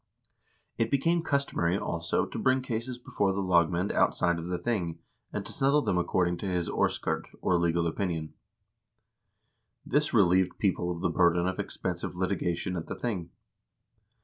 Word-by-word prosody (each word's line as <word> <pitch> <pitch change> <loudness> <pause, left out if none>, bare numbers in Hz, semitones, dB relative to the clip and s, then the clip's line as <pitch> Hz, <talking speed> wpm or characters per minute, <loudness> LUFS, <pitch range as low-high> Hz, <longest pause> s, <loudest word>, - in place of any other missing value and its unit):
It 115 - +2
became 165 +6 +2
customary, 140 - 0
also, 85 -4 -1
to - - -6
bring 130 0 +2
cases 120 +1 -3
before 100 -5 -1
the 100 0 -1
lagmand 90 +1 +2
outside 85 -1 +2
of 85 - -6
the 90 0 -1
thing, 85 -4 -2 0.3
and - - -4
to - - -6
settle 140 +2 +3
them 90 - +1
according 90 0 +1
to 100 - -5
his 90 -2 -1
orskurd, - - -1
or 90 -2 +2
legal 85 0 +1
opinion. 80 -2 -2 1.5
This 150 +3 +1
relieved 95 -4 +3
people 95 -3 0
of 85 -1 -3
the 90 - +1
burden 85 +1 +3
of 95 0 -2
expensive 90 -1 -3
litigation 90 -1 -1
at 85 - -4
the - - -4
thing. 95 -8 -3
90 Hz, 155 wpm, -29 LUFS, 85-110 Hz, 1.5 s, settle